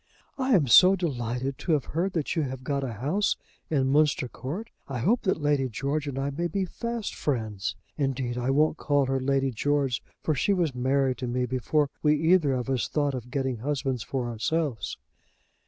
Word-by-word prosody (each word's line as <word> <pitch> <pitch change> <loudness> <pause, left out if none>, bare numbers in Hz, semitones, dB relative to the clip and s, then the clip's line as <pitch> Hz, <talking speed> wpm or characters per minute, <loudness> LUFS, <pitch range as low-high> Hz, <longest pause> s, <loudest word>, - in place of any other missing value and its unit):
"I 260 -3 +2
am 165 -7 +4
so 180 - +8
delighted 130 -6 -2
to 170 - 0
have 145 -5 +1
heard 180 +4 0
that 160 -1 -1
you 165 - +2
have 130 -2 -4
got 140 +1 -1
a 125 -3 -3
house 150 - 0 0.3
in 135 -4 +1
Munster 145 -3 +3
Court. 170 - -6 0.2
I 135 - -4
hope 205 - +2
that 185 -4 0
Lady 145 -3 +1
George 140 +6 -2
and 135 -2 -4
I 140 +1 -1
may 170 +5 -1
be 190 +3 -1
fast 235 +3 -4
friends. 110 -8 -2 0.2
Indeed, 130 -3 -1
I 125 +1 -1
won't 150 +3 +3
call 145 -2 +2
her 135 0 0
Lady 135 0 +1
George; 140 +1 0 0.2
for 155 - +1
she 150 +9 +2
was 170 -7 +1
Mary 130 +1 +1
to 125 - -4
me 125 +1 0
before 135 +4 0
we 150 0 +4
either 160 -2 +3
of 125 -1 -2
us 130 -2 0
thought 145 -2 0
of 125 -2 -6
getting 130 -1 -1
husbands 135 -1 -1
for 125 +3 -3
ourselves." 120 +3 -2
140 Hz, 195 wpm, -27 LUFS, 130-155 Hz, 0.3 s, so